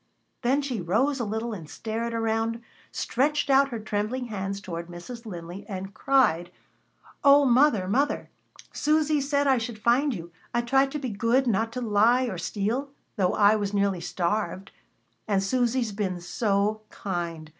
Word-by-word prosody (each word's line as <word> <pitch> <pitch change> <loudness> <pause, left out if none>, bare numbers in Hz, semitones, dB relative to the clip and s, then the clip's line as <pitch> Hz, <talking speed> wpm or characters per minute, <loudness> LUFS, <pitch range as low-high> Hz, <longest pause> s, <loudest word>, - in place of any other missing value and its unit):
Then 265 +4 +2
she 250 -7 -3
rose 255 +11 +1
a - - 0
little 220 +2 -3
and 165 -7 -8
stared 225 +1 -4
around 225 0 -1 0.3
stretched 285 +3 0
out 275 +1 +5
her 235 - -4
trembling 215 +4 -2
hands 195 -1 -3
toward 170 -3 -6
Mrs. 225 +7 -9
Linley, 175 0 -7
and 195 0 -5
cried: 215 - +2 0.7
"O 285 0 +7
mother! 245 -6 +4
mother! 275 +9 0 0.4
Susy 305 0 +2
said 285 +1 +1
I 265 -3 +4
should 225 -1 -5
find 245 +7 +2
you. 170 -2 -8 0.2
I 240 - +3
tried 270 +3 +3
to - - -1
be 265 -3 -4
good, 230 +5 +1
not 225 -1 +1
to 250 - -4
lie 230 +3 +3
or 205 -9 -3
steal, 215 +10 -2 0.3
though 190 -5 +1
I 205 +1 +5
was 205 -1 -2
nearly 200 -3 +1
starved. 180 +2 -2 0.6
And 195 -2 +1
Susy's 245 +1 +1
been 195 -3 -2
so 205 +3 0
kind. 170 -4 -4
220 Hz, 160 wpm, -26 LUFS, 195-255 Hz, 0.7 s, O